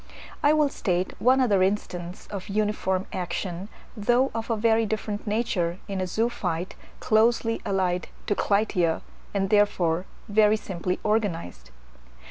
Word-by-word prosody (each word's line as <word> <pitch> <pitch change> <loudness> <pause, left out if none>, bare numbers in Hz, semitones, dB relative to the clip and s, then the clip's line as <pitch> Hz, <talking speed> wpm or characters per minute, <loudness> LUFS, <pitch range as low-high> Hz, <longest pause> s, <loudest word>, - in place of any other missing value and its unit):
I 290 - +5
will 305 -2 +3
state 180 -8 -1
one 255 +2 +4
other 210 -7 +3
instance 185 -2 -2
of 200 0 -6
uniform 200 -2 0
action, 180 +1 -4 0.3
though 240 +5 +2
of 225 +1 -4
a 230 - +1
very 225 +1 +3
different 215 0 -3
nature, 205 -6 0
in 195 -2 -3
a 185 - -1
zoophyte 185 -5 -1 0.3
closely 225 +1 +2
allied 185 -3 0 0.2
to - - +1
Clytia, 200 -5 +1 0.3
and 195 0 -1
therefore 185 -4 +2 0.2
very 215 +1 +4
simply 180 -3 -3
organized. 170 - -1
205 Hz, 130 wpm, -26 LUFS, 180-220 Hz, 0.3 s, I